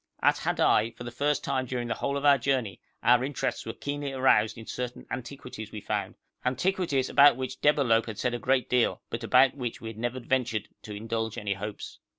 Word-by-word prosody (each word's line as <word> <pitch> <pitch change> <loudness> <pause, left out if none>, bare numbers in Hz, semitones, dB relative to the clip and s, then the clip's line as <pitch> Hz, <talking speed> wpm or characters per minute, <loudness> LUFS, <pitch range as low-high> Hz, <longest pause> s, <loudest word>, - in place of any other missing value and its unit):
At - - +4
Hadai 115 +2 +2
for - - -9
the 120 - -6
first 145 +4 0
time 130 -1 -1
during 120 -1 -3
the 115 - 0
whole 140 +4 -2
of 140 - -3
our 140 -1 +6
journey 120 -7 -1 0.2
our 120 +2 +5
interests 135 -3 -3
were 115 - -3
keenly 145 -1 -4
aroused 125 -5 +3
in 115 - -9
certain 125 +1 -5
antiquities 125 -3 -7
we 105 - -6
found - - -3 0.3
antiquities 145 0 0
about 140 -3 +6
which 130 0 -5
Debalohp 130 -7 +3
had 110 -3 -6
said 125 +1 -1
a 120 - -2
good 130 +1 +1
deal, 125 -2 +1
but 115 0 -4
about 125 +4 +5
which 125 -4 -5
we 115 - -6
had 110 -1 -9
never 120 +2 -2
ventured 120 -4 -1
to 105 - -8
indulge 110 +1 -3
any 100 -1 -1
hopes. 105 +1 -7
125 Hz, 205 wpm, -28 LUFS, 115-135 Hz, 0.3 s, our